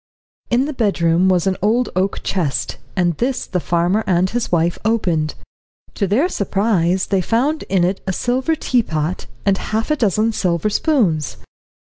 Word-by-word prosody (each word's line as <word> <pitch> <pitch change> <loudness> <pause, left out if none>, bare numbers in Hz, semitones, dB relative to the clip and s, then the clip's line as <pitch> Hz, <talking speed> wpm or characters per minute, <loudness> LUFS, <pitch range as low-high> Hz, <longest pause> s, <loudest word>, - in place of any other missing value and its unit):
In 250 +3 +2
the 300 - -4
bedroom 185 -6 +2
was 180 -2 +2
an 190 -1 0
old 230 +5 +2
oak 190 +2 -1
chest, 165 -8 -1 0.2
and 175 -3 +1
this 255 +1 -1
the 180 - -2
farmer 175 +5 +1
and 185 0 +2
his 240 0 -2
wife 170 0 +1
opened. 175 -9 0 0.6
To 200 - -1
their 240 - +2
surprise 195 - +1
they 195 -2 +1
found 265 - 0
in 185 -2 +2
it 185 +2 0
a - - +1
silver 255 - 0
teapot, 180 - -1 0.2
and 195 -1 +2
half 220 +6 -2
a - - +3
dozen 220 - +1
silver 180 0 0
spoons. 195 - +1
195 Hz, 160 wpm, -19 LUFS, 175-230 Hz, 0.6 s, a